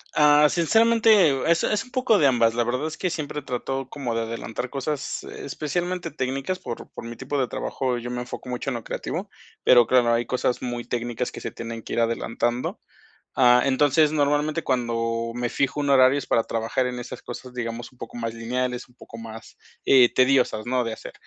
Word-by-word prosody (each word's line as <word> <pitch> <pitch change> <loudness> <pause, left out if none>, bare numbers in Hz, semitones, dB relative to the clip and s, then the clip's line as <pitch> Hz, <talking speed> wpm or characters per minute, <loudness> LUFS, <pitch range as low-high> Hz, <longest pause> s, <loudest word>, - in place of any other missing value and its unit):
Ah, 150 0 +6
sinceramente, 225 +7 +3 0.2
eh, 135 -2 -1
es 170 0 +3
es 210 - 0
un 250 - -18
poco 255 -4 +3
de 145 - +5
ambas. 115 -3 +3
La 120 0 +1
verdad 125 +6 -1
es 160 - -7
que 185 - -1
siempre 150 -3 -4
trato 135 +1 -4
como 125 -5 -4
de 115 - 0
adelantar 115 +2 -5
cosas, 140 +2 -3
especialmente 175 +5 -4
técnicas, 135 +6 -3
por 115 - -7
por - - -9
mi 120 0 -7
tipo 140 +2 -3
de 130 - +1
trabajo, 125 +2 -2
eh, - - -6
yo 120 - -5
me 125 0 -3
enfoco 125 +1 -8
mucho 125 +2 -3
en 130 - -2
lo 115 - -5
creativo, - - -4 0.3
pero 120 -2 +7
claro, 120 0 +3
hay 120 +1 +1
cosas 125 0 -1
muy 120 -1 -4
técnicas 120 0 -3
que - - -9
se - - -4
tienen 115 -1 -7
que - - -7
ir - - 0
adelantando. 115 +1 -1 0.6
Ah, 125 -1 +6
entonces 145 +3 +3
normalmente 150 +2 +1
cuando 115 -2 -1
me 120 0 -1
fijo 140 +4 -1
un 145 - -1
horario 130 +1 +6
es - - -6
para 115 - +2
trabajar 115 +3 -1
en 125 -1 -4
esas 120 0 -8
cosas, 125 +1 -9
digamos 120 0 -5
un 125 - -24
poco - - -8
más 115 -1 -3
lineales, 125 +2 -3
un 125 - -24
poco 115 - -12
más, 115 0 -10 0.3
eh, 125 -3 +6
tediosas, 130 -4 +2
¿no? 125 0 +1
De 115 -1 -3
hacer, - - -8
125 Hz, 210 wpm, -24 LUFS, 120-145 Hz, 0.6 s, pero